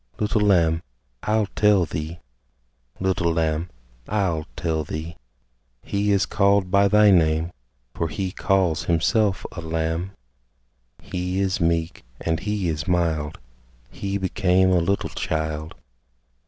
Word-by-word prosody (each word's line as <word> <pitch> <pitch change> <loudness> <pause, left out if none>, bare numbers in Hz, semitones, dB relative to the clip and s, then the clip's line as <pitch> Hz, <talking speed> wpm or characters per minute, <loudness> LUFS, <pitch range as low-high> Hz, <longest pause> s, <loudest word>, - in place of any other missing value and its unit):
Little 105 +1 0
Lamb, 85 -5 +3 0.4
I'll 110 0 +1
tell 105 -4 +4
thee; 80 +2 -5 0.8
Little 95 -3 +1
Lamb, 80 +1 0 0.4
I'll 90 -6 -1
tell 80 -3 -1
thee: 80 +2 -6 0.7
He 100 +1 0
is 100 0 +3
called 100 -2 +2
by 100 0 +5
thy 105 +1 +6
name, 80 -1 +3 0.4
For 85 - -1
He 95 +4 -3
calls 95 -5 +1
Himself 95 +4 +1
a 85 - -7
Lamb 80 +3 -2 0.9
He 90 +1 -3
is 95 -1 0
meek, 85 -3 0 0.2
and 80 -1 -1
He 105 -1 -2
is 75 0 -2
mild, 80 -4 0 0.5
He 100 0 -3
became 95 -1 +2
a 90 - +4
little 95 +4 0
child. 80 0 -3
90 Hz, 125 wpm, -23 LUFS, 80-100 Hz, 0.9 s, thy